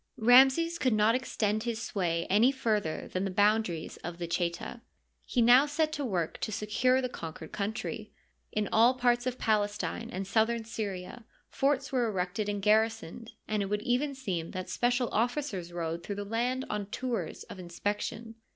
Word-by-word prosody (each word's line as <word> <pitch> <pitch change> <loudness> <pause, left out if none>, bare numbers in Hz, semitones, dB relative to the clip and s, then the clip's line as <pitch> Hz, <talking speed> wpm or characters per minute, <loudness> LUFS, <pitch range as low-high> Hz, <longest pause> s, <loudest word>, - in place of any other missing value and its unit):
Ramses 265 +8 +5
could 255 -3 +2
not 215 +2 +4
extend 220 -4 0
his 230 -1 -3
sway 175 -7 -1
any 215 +7 +5
further 215 -11 -1
than 185 - -2
the 195 - -1
boundaries 205 -4 +1
of 175 0 -7
the 175 - -3
Cheta. 170 +6 -3 0.5
He 245 - +2
now 250 +5 +7
set 310 +1 0
to 295 -2 -3
work 180 - -2
to - - -3
se 210 0 -3
cure 255 +5 +2
the - - +1
conquered 160 -8 -8
country. 215 +1 -4 0.4
In 210 -1 -1
all 235 +3 +5
parts 245 -1 +2
of 255 0 -2
Palestine 215 +1 -1
and 195 -3 -4
southern 225 +3 +1
Syria 205 -1 -5 0.3
forts 275 0 0
were 250 -3 +1
erected 195 +1 -2
and 205 -1 -3
garrisoned, 220 0 +1 0.2
and 215 -1 0
it 195 - -1
would 210 +1 -2
even 275 +4 0
seem 185 -11 -3
that 185 0 -5
special 245 0 +1
officers 235 - -1
rode 170 -1 -3
through 200 +3 -5
the 205 0 -4
land 245 +5 -1
on 210 -1 -3
tours 225 -6 -3
of 190 - -11
inspection. 205 +5 -4
220 Hz, 175 wpm, -30 LUFS, 195-245 Hz, 0.5 s, now